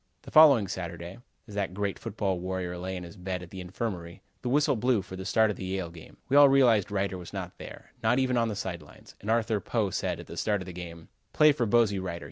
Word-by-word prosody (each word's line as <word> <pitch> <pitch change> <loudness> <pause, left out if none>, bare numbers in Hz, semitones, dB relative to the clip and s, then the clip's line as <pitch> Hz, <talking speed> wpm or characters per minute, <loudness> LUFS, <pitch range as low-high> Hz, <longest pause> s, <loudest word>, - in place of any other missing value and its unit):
The - - -11
following 140 -10 +7
Saturday, 85 +1 -6 0.3
as 105 - -11
that 100 -2 -2
great 100 -1 -2
football 100 -5 -2
warrior 90 -1 -3
lay 95 +2 -4
in 90 - -6
his 85 +2 -10
bed 90 -1 -4
at 85 - -12
the 95 - -7
infirmary, 90 -2 -5 0.2
the 125 - -3
whistle 145 +1 +3
blew 120 -2 +1
for 95 0 -9
the 95 0 -7
start 110 +2 +3
of - - -7
the - - -6
Yale 95 -2 -3
game. 85 -2 -13
We 135 - +1
all 145 -1 +9
realized 120 -8 +4
Reiter 95 -2 -1
was 90 - -10
not - - -6
there: - - -10
not 115 +2 +2
even 130 -1 +1
on 115 -1 +2
the 110 - -3
side 90 -4 -4
lines, 75 - -16
and 105 - -6
Arthur 110 -2 +2
Poe 105 -2 -1
said, - - -2
at - - -9
the - - -10
start 105 -1 +1
of 90 - -7
the 90 - -8
game: 85 -2 -9 0.2
"Play 150 0 +6
for 125 -5 -1
Bosey 105 -3 +3
Reiter. 85 -2 -4
100 Hz, 255 wpm, -28 LUFS, 90-115 Hz, 0.3 s, all